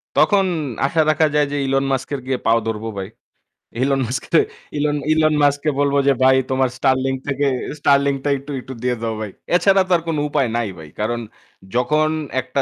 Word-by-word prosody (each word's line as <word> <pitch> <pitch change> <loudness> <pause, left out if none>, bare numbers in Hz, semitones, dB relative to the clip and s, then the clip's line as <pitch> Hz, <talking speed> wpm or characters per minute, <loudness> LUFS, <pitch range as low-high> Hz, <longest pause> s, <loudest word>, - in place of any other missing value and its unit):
তখন 200 -2 +4 0.4
আশা 160 +3 +2
রাখা 155 +1 +3
যায় 150 -1 +3
যে 145 - -2
Elon 135 0 +1
Musk-এর 135 +1 -2
গিয়ে 130 -1 -1
পাও 115 +1 +4
ধরবো 110 0 -3
ভাই। 95 - -4 0.7
Elon 135 0 +2
Musk 125 +3 -3
কে, 165 - +7 0.4
Elon, 145 0 0
Elon 155 -1 +3
Musk 145 0 +3
কে - - +3
বলব 140 -1 +2
যে 140 - +6
ভাই 130 0 +6 0.2
তোমার 130 -1 +2
Starlink 130 0 +1
থেকে 145 0 0 0.3
Starlink-টা 140 0 +2
একটু, 140 +2 -9
একটু 130 - -9
দিয়ে 125 -1 +1
দাও 115 -1 -2
ভাই। 105 -3 -5 0.2
এছাড়া 195 +1 +4
তো - - -7
আর - - -7
কোন 160 -2 -1
উপায় 140 -4 +1
নাই 120 -2 -1
ভাই। 80 -2 -11
কারণ 120 +3 -1 0.6
যখন 150 +5 +2 0.3
একটা 130 +2 -2
135 Hz, 190 wpm, -20 LUFS, 130-150 Hz, 0.7 s, কে